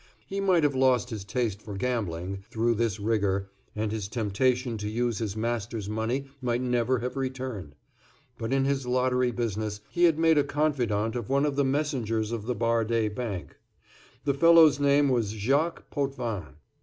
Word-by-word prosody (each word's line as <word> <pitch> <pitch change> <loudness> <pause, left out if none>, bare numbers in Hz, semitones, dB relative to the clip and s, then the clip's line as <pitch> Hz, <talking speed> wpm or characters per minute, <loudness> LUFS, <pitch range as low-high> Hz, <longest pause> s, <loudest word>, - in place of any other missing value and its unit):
He 195 - -4
might 185 -4 +3
have 145 -1 +3
lost 130 -2 +2
his 105 -3 -4
taste 105 0 -2
for 105 -2 -7
gambling, 95 -5 -2
through 115 +1 +1
this 115 -2 -1
rigor, 100 -2 0 0.2
and 105 0 -1
his 110 -3 -3
temptation 120 +3 0
to 105 0 -3
use 120 0 -1
his 110 -2 -3
master's 115 -2 -2
money 110 +6 -2 0.2
might 120 -1 0
never 125 0 +1
have 125 +2 -4
returned; 130 - -4 0.6
but 115 +1 -4
in 135 0 +2
his 135 -2 -1
lottery 125 0 +2
business 110 -3 -3
he 175 0 +3
had 165 -3 +4
made 160 -1 +4
a - - +4
confidant 120 -8 0
of 120 -4 -4
one 140 +2 +2
of 145 -2 -1
the 140 - +2
messengers 130 -6 -1
of 115 -2 -4
the 125 - 0
Bardé 115 -2 +1
Bank. 105 -7 -5 0.7
The 140 - +2
fellow's 160 0 +6
name 140 0 +4
was 120 -6 +1
Jacques 140 +10 0
Potvin. 120 - -3
120 Hz, 170 wpm, -27 LUFS, 110-135 Hz, 0.7 s, fellow's